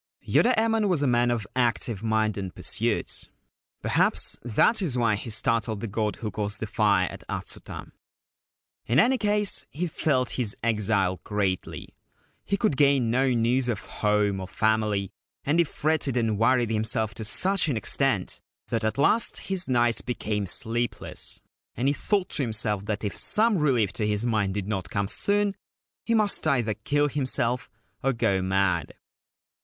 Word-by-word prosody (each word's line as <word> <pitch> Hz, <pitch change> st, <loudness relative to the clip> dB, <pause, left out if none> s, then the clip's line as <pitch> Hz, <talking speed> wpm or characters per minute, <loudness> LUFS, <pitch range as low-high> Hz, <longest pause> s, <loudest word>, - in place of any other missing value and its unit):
Yoda 245 Hz, -, +4 dB
Emon 225 Hz, -1 st, +2 dB
was 165 Hz, -6 st, +1 dB
a -, -, +2 dB
man 120 Hz, 0 st, +3 dB
of 120 Hz, -4 st, -1 dB
active 120 Hz, -4 st, 0 dB
mind 110 Hz, -1 st, +1 dB
and 95 Hz, -3 st, -6 dB
pursuits. -, -, -1 dB, 0.5 s
Perhaps -, -, +1 dB
that 120 Hz, -, +2 dB
is 145 Hz, -10 st, -1 dB
why 115 Hz, -3 st, +2 dB
he 105 Hz, +3 st, -4 dB
startled 110 Hz, 0 st, 0 dB
the 115 Hz, -, -4 dB
god 105 Hz, 0 st, -2 dB
who 110 Hz, -2 st, -5 dB
caused 105 Hz, +1 st, -4 dB
the -, -, -3 dB
fire 100 Hz, -3 st, +2 dB
at -, -, -10 dB
Atsuta. -, -, -6 dB, 1.0 s
In 120 Hz, +4 st, +3 dB
any 255 Hz, +8 st, +4 dB
case, 210 Hz, -1 st, +2 dB
he 170 Hz, +5 st, -3 dB
felt 140 Hz, -6 st, 0 dB
his 105 Hz, -4 st, -1 dB
exile 100 Hz, -4 st, +1 dB
greatly. 100 Hz, -3 st, -3 dB, 0.5 s
He 200 Hz, -, -1 dB
could 200 Hz, -, 0 dB
gain 140 Hz, -5 st, +3 dB
no 130 Hz, +2 st, +2 dB
news 120 Hz, +1 st, +1 dB
of 105 Hz, -3 st, -3 dB
home 105 Hz, -2 st, 0 dB
or 95 Hz, -, -6 dB
family, 105 Hz, -1 st, 0 dB, 0.3 s
and 150 Hz, +4 st, +1 dB
he -, -, +6 dB
fretted 145 Hz, -4 st, -1 dB
and 110 Hz, -3 st, 0 dB
worried 120 Hz, 0 st, +3 dB
himself 110 Hz, -1 st, 0 dB
to 110 Hz, -, -7 dB
such 185 Hz, -, +1 dB
an 130 Hz, -, 0 dB
extent 110 Hz, -, 0 dB, 0.3 s
that 115 Hz, -1 st, -1 dB
at 110 Hz, +3 st, -1 dB
last 215 Hz, +11 st, +3 dB
his 185 Hz, -4 st, -2 dB
nights 120 Hz, -2 st, +2 dB
became 105 Hz, -4 st, -3 dB
sleepless 120 Hz, +4 st, 0 dB, 0.4 s
and 125 Hz, +4 st, 0 dB
he 140 Hz, -, +3 dB
thought 200 Hz, +4 st, -1 dB
to -, -, +1 dB
himself 105 Hz, -4 st, -1 dB
that 105 Hz, 0 st, -3 dB
if 100 Hz, -, -3 dB
some 215 Hz, -3 st, +1 dB
relief 125 Hz, -10 st, +2 dB
to 105 Hz, -, -2 dB
his 105 Hz, +2 st, -1 dB
mind 105 Hz, -5 st, 0 dB
did 100 Hz, -2 st, -3 dB
not 100 Hz, -3 st, -3 dB
come 100 Hz, -4 st, -1 dB
soon 205 Hz, -, +1 dB, 0.5 s
he 230 Hz, -, +1 dB
must 210 Hz, -6 st, +2 dB
either 120 Hz, -7 st, +1 dB
kill 145 Hz, +8 st, 0 dB
himself 130 Hz, -3 st, -1 dB, 0.3 s
or 135 Hz, +1 st, +1 dB
go 115 Hz, -5 st, +1 dB
mad. 95 Hz, 0 st, 0 dB
115 Hz, 165 wpm, -26 LUFS, 105-140 Hz, 1.0 s, he